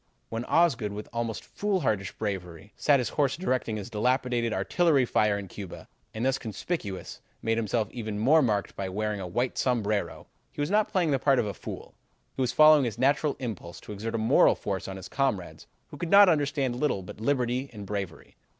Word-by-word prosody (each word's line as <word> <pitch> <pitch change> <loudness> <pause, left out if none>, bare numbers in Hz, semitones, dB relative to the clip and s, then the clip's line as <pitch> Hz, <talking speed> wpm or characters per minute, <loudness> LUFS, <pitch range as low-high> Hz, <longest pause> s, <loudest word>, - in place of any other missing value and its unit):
"When 115 +2 -4
Osgood, 130 -13 +2
with 105 +1 -6
almost 115 -2 -3
foolhardy 160 - -1
bravery, 95 -3 -5
sat 145 -2 +4
his 125 - -1
horse 140 -2 0
directing 130 -10 -1
his 105 +3 -7
dilapidated 120 +1 +1
artillery 140 - +2
fire 105 -3 +2
in 100 -1 -6
Cuba, 95 0 -9 0.2
and 110 +3 -3
thus 135 0 +1
conspicuous, 110 - -5 0.2
made 115 0 +1
himself 110 0 0
even 110 -4 -5
more 140 +9 +5
marked 105 -6 0
by 95 -1 -3
wearing 105 +2 -2
a 95 - -5
white 120 +8 -1
sombrero, 105 -8 -1 0.3
he - - -13
was 145 +4 -1
not 210 0 +2
playing 175 -5 +2
the 135 - +2
part 135 0 +3
of 115 - +2
a 100 - -3
fool; - - -8 0.4
he - - -4
was 125 - +1
following 155 -1 +7
his 115 -2 -3
natural 140 +3 +2
impulse 105 -9 -6
to - - -10
exert 110 +3 -4
a - - +1
moral 110 0 +4
force - - -4
on 95 0 -6
his 95 - -8
comrades 125 -10 -2 0.2
who - - -10
could 170 - -4
understand 145 -10 +5
little 125 -9 0
but 95 - -10
liberty 125 +1 0
and 105 -3 -8
bravery. 95 -4 -5
115 Hz, 195 wpm, -27 LUFS, 105-140 Hz, 0.4 s, following